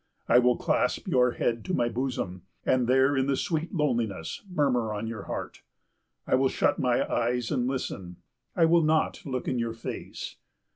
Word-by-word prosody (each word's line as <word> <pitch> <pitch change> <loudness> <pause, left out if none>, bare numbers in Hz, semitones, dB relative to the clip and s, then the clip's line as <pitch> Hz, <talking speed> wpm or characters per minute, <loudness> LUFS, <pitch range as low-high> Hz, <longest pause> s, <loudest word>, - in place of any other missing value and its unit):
I 125 - +6
will 125 0 +3
clasp - - 0
your 125 -1 +3
head 115 -1 -1
to 185 - -1
my 120 - +2
bosom; 120 -7 -3 0.2
and 125 -2 +2
there 130 +2 +4
in 135 0 +1
the 140 -1 +1
sweet 160 0 -1
loneliness 115 - -1
murmur 130 -10 +1
on 105 +2 -3
your 110 -3 -5
heart. - - -5 0.6
I - - -1
will 130 +1 +4
shut - - +1
my 125 -2 +2
eyes 120 0 0
and 125 - +1
listen. 95 -9 -4 0.4
I 165 - +5
will 170 +1 +5
not 155 +1 +1
look 130 -2 -3
in 125 - 0
your 115 -1 -1
face. 115 - -7
125 Hz, 180 wpm, -28 LUFS, 115-135 Hz, 0.6 s, I